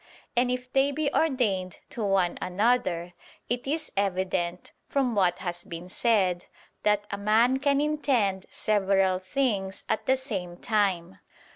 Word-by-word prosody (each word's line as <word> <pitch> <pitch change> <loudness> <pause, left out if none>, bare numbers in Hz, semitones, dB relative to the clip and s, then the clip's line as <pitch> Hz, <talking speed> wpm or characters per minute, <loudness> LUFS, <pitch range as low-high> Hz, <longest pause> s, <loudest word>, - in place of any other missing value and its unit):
And 245 +1 +3
if 250 0 -4
they 270 +1 +3
be 285 0 -1
ordained 215 - +1
to 230 - -3
one 195 -3 +1
another, 185 -3 0 0.4
it 245 +2 -2
is 310 +2 -2
evident, 185 -3 -1 0.2
from 265 -4 +1
what 185 -4 +2
has 175 -1 -4
been 170 +2 -8
said, 190 -5 +1 0.3
that 210 -1 +2
a 200 - -3
man 225 +6 +3
can 280 0 +2
intend 260 -11 +1
several 195 -3 +2
things 195 -1 -1
at 220 - -1
the 265 - +4
same 190 -10 -4
time. 190 - 0
205 Hz, 140 wpm, -27 LUFS, 185-250 Hz, 0.4 s, the